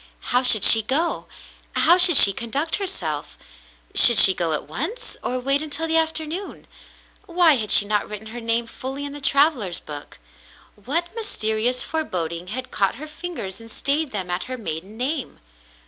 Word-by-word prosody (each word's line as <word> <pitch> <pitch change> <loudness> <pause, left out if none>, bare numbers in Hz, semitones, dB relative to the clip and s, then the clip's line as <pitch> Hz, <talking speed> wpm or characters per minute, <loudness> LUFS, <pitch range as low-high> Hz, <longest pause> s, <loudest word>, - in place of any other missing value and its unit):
How 250 - +2
should 240 -5 +5
she 225 - +8
go? 285 +10 -4 0.5
How 350 +2 +3
should 355 -4 +9
she 200 - +8
conduct 275 - -3
herself? 175 - -6 0.6
Should 235 - +9
she 190 - +9
go 170 -3 -4
at 150 - -4
once, 340 - -5
or 255 - -5
wait 275 +3 -2
until 310 +1 -6
the 325 - -3
after 320 -1 -1
noon? 355 +6 -9 0.6
Why 340 -2 +2
had 215 -3 -5
she 205 - +6
not 210 0 -4
written 210 +1 -10
her 240 +2 -10
name 230 +1 -3
fully 270 +4 -9
in 285 - -10
the 290 - -11
travellers' 275 - 0
book? 145 -1 -13 0.6
What 315 - -5
mysterious 245 - -3
foreboding 175 - -6
had 255 +6 -8
caught 195 +1 -2
her 300 +6 -11
fingers 305 - -9
and 230 - -15
stayed 285 +5 -4
them 190 -6 -7
at 180 +1 -5
her 255 0 -9
maiden 195 0 -9
name 265 +2 -6
255 Hz, 175 wpm, -19 LUFS, 210-315 Hz, 0.6 s, should